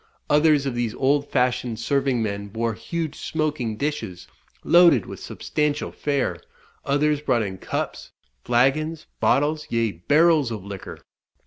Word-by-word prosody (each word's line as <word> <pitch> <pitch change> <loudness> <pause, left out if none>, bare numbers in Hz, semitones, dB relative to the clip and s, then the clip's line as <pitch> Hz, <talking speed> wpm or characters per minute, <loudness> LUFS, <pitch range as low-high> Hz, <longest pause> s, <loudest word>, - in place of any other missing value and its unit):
Others 150 -1 +4
of 135 - -1
these 120 -2 -2
old 140 +2 +1
fashioned 125 -3 0
serving 135 -1 +1
men 100 -1 -3
bore 115 +2 -2
huge 155 +8 -4
smoking 150 -9 -2
dishes, 110 -11 -4 0.4
loaded 170 - +6
with - - -8
substantial 150 -1 -2
fare; 140 -3 -2 0.4
others 145 +1 +1
brought 120 -6 +1
in 95 -2 -5
cups, - - -4 0.3
flagons, 145 +7 +1
bottles, 150 +1 +1
yea 115 -2 +1
barrels 150 - +3
of 105 -4 -6
liquor. 100 -2 -8
135 Hz, 130 wpm, -23 LUFS, 115-150 Hz, 0.4 s, loaded